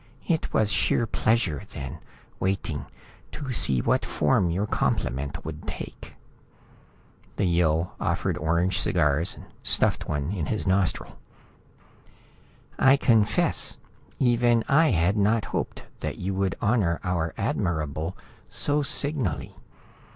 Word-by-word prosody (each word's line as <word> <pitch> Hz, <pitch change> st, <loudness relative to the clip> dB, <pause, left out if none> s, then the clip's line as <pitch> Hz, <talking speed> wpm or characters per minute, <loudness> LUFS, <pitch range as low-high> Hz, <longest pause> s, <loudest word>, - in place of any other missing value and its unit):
It 160 Hz, -2 st, 0 dB
was 110 Hz, -1 st, +2 dB
sheer 120 Hz, -, +2 dB
pleasure 110 Hz, -9 st, +1 dB
then, 65 Hz, -2 st, -6 dB, 0.4 s
waiting, 85 Hz, -7 st, -2 dB, 0.5 s
to 140 Hz, -3 st, -5 dB
see 65 Hz, -, +1 dB
what -, -, +2 dB
form 90 Hz, -3 st, +1 dB
your 95 Hz, +5 st, 0 dB
compliment 70 Hz, -, -1 dB
would 80 Hz, 0 st, -7 dB
take." -, -, -7 dB, 1.2 s
The -, -, 0 dB
Yill 85 Hz, -1 st, +1 dB
offered -, -, 0 dB
orange 85 Hz, +4 st, +1 dB
cigars, 75 Hz, +5 st, +2 dB, 0.2 s
stuffed -, -, +3 dB
one 75 Hz, +2 st, -1 dB
in 85 Hz, -7 st, -2 dB
his 110 Hz, -, -2 dB
nostril. 95 Hz, -1 st, 0 dB, 1.6 s
"I 135 Hz, +1 st, +6 dB
confess 115 Hz, -6 st, +2 dB, 0.4 s
even 120 Hz, -2 st, +3 dB
I 155 Hz, +3 st, +5 dB
had 90 Hz, +2 st, +2 dB
not 105 Hz, +1 st, +2 dB
hoped -, -, -3 dB, 0.2 s
that -, -, -4 dB
you 95 Hz, +2 st, -3 dB
would 95 Hz, -2 st, 0 dB
honor 100 Hz, -7 st, +1 dB
our 85 Hz, -3 st, -1 dB
Admirable 80 Hz, 0 st, -2 dB, 0.3 s
so 145 Hz, +1 st, 0 dB
signally. 140 Hz, -, -1 dB
95 Hz, 115 wpm, -26 LUFS, 80-115 Hz, 1.6 s, I